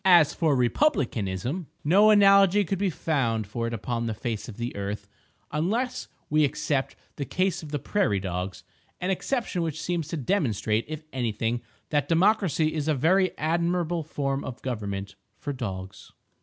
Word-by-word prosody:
As 175 -6 +6
for 155 -4 +2
Republicanism, 125 - 0 0.2
no 195 +8 +6
analogy 200 -1 +6
could 195 +1 -2
be 200 -1 +2
found 125 -10 0
for 115 +4 -3
it 115 - -4
upon 115 +1 -2
the 110 - -2
face 115 0 -4
of 105 - -9
the 120 +1 -4
earth—unless 150 - -3 0.2
we 155 +1 +3
except 140 -1 0 0.2
the 140 - -2
case 185 +6 0
of 155 - -9
the 145 - 0
"prairie 145 - +1
dogs," 90 0 -4 0.4
an 180 +2 -1
exception 215 -2 -1
which 160 -2 -2
seems 170 -4 -2
to 165 - -3
demonstrate, 120 - 0
if 155 0 -6
anything, 120 -1 -1 0.3
that 145 -2 +1
democracy 170 -3 +3
is 155 -2 -2
a 155 - +3
very 180 +6 +2
admirable 170 +1 0
form 140 -3 -2
of 130 -1 -6
government—for 105 +2 -5
dogs. 95 -7 -6
145 Hz, 155 wpm, -26 LUFS, 115-175 Hz, 0.4 s, As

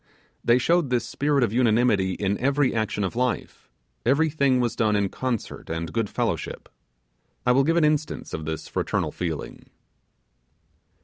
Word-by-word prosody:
They 120 +1 +5
showed 165 +3 +2
this 125 -2 +1
spirit 145 -2 +1
of 110 -3 0
unanimity 115 -5 +3
in 100 +1 -1
every 140 +1 +2
action 110 -2 -1
of 95 +4 -2
life; 125 0 -2 0.3
everything 140 -1 +2
was 120 -2 0
done 110 -2 +2
in 100 -1 +1
concert 125 -1 -4
and 80 0 -4
good 115 -3 0
fellowship. - - -3 0.8
I 125 - +4
will 135 +2 +4
give 165 +4 +2
an 165 - +4
instance 150 0 -1
of 80 - -4
this 80 0 -4
fraternal - - -1
feeling. 80 -4 -5
120 Hz, 150 wpm, -25 LUFS, 105-140 Hz, 0.8 s, They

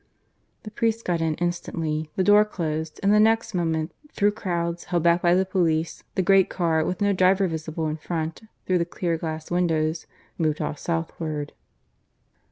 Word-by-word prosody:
The 215 - -8
priest 225 +1 -1
got 170 -2 0
in 160 -1 0
instantly; 165 -2 -2
the 190 - +1
door 205 +2 +6
closed; 160 -6 -4
and 200 +1 +4
the 210 - +5
next 225 0 +3
moment, 160 -2 -1 0.2
through 205 +1 +2
crowds, 170 -5 -3
held 175 -3 0
back 170 0 +4
by 175 0 +4
the 190 +1 +2
police, 165 -4 0
the 190 - +1
great 195 0 +5
car, 165 -3 +1
with 185 +5 -3
no 205 0 +3
driver 190 +1 +3
visible 160 -1 -4
in 155 0 -2
front 160 +2 -4 0.2
through 185 -1 +2
the - - +2
clear 170 -1 -2
glass 160 -1 -5
windows, 165 -2 0 0.3
moved 155 -2 +1
off 145 - -3
southward. 160 -3 -3
170 Hz, 175 wpm, -25 LUFS, 160-190 Hz, 0.3 s, door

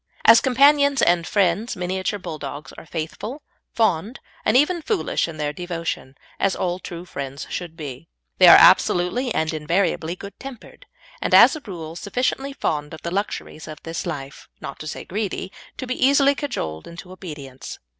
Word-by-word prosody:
As 230 0 +8
companions 280 +2 +4
and 170 -1 +3
friends 205 +3 +1
Miniature 185 +3 -2
Bulldogs 150 -5 -7
are - - -12
faithful, 190 - -5 0.3
fond, 215 +1 0 0.2
and 215 - +4
even 335 +5 +2
foolish 400 - 0
in 165 -2 -8
their 150 -1 -2
devotion, 165 -5 -5 0.2
as 195 -1 +1
all 180 0 -2
true 175 -1 -8
friends 140 -3 -6
should 170 -2 -5
be. 135 - -8 0.3
They - - +8
are - - +11
absolutely 235 +9 +4
and 160 -4 0
invariably 170 +1 0
good 200 +2 -11
tempered, 275 - -11 0.3
and, - - +2
as - - +8
a 310 - -7
rule, 165 -4 -7
sufficiently 250 +8 -2
fond 150 - -2
of - - -15
the 170 - -3
luxuries 195 -5 -4
of 155 -1 -8
this 165 +2 -5
life 140 -4 -7
not 140 - -8
to 155 - -7
say - - -6
greedy 200 -1 -3 0.3
to - - -5
be 255 0 -2
easily 280 +1 +5
cajoled 80 - -4
into 180 +2 -10
obedience. 145 -8 -9
180 Hz, 165 wpm, -22 LUFS, 155-235 Hz, 0.3 s, are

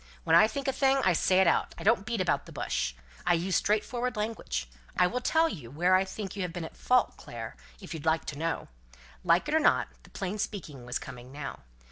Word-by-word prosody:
When - - +4
I 215 - +8
think 275 +4 -4
a 270 - +2
thing 270 0 +3
I 185 - +5
say 185 +3 +4
it - - +5
out. 170 - +2
I - - -7
don't 215 -1 +3
beat 230 -4 0
about 180 - 0
the - - -10
bush. - - -2 0.3
I 175 0 +4
use 175 +2 0
straightforward 240 +5 0
language. 210 - -2 0.3
I 180 - +6
will 245 +8 -1
tell 320 +5 +3
you 145 - -6
where 175 +7 +2
I 190 +1 +5
think 195 0 -6
you 200 - -3
have 180 -2 -2
been 175 0 -5
in - - -9
fault, 250 0 +2
Clare, - - -7 0.2
if 185 - -8
you 160 - -4
like 160 +2 +1
to - - -5
know." 165 +1 -2 0.6
Like 170 - +3
it 295 - -1
or 315 - +5
not, 300 - +3
the - - -18
plain 195 +2 -4
speaking 150 - -5
was 120 - -1
coming 125 +1 -9
now. 140 0 -6
185 Hz, 235 wpm, -29 LUFS, 160-225 Hz, 0.6 s, I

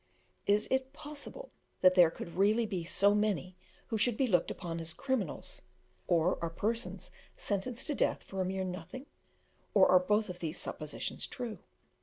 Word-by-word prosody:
Is 205 +1 +3
it 265 +1 0
possible 300 +13 -8 0.3
that 185 0 +7
there 175 -3 +7
could 170 +1 -8
really 210 +5 +3
be 190 -5 -3
so 200 +4 +3
many 205 -3 0 0.3
who 220 - -1
should 220 +1 +4
be 270 - +3
looked 180 -8 +2
upon 170 -2 -4
as 165 0 -4
criminals 260 - -2 0.5
or 175 +1 +2
are 170 - 0
persons 225 +8 -2 0.3
sentenced 230 +5 -2
to 300 - 0
death - - +1
for 190 -1 -4
a - - +1
mere 190 +1 -2
nothing 185 +9 -6 0.7
or 195 -2 +7
are 185 - +8
both 205 -1 0
these 160 -2 -3
suppositions 150 -1 -4
true? 240 -4 -5
200 Hz, 165 wpm, -32 LUFS, 180-235 Hz, 0.7 s, are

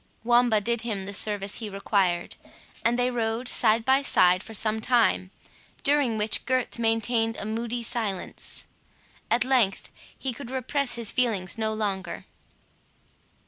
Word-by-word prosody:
Wamba 240 -2 +4
did 235 +2 -1
him 210 -5 -3
the 200 - -6
service 205 -1 +1
he 220 -3 -5
required, 195 -3 0 0.5
and 235 +1 +2
they 250 0 +1
rode 230 +1 -1
side 225 -1 +2
by 265 +1 +4
side 180 -9 +4
for 225 +1 -8
some 215 +1 +1
time, 220 -5 +2 0.5
during 280 -6 +3
which 215 0 0
Gurth 255 -2 0
maintained 225 0 +1
a - - -5
moody 230 +2 -3
silence. 220 -5 -4 0.6
At 240 +1 +3
length 250 -7 +1 0.3
he 265 -2 -3
could 240 0 -9
repress 265 +1 -1
his 230 -3 -2
feelings 220 -7 0
no 220 -1 -1
longer. 205 -3 -3
225 Hz, 140 wpm, -26 LUFS, 210-245 Hz, 0.6 s, Wamba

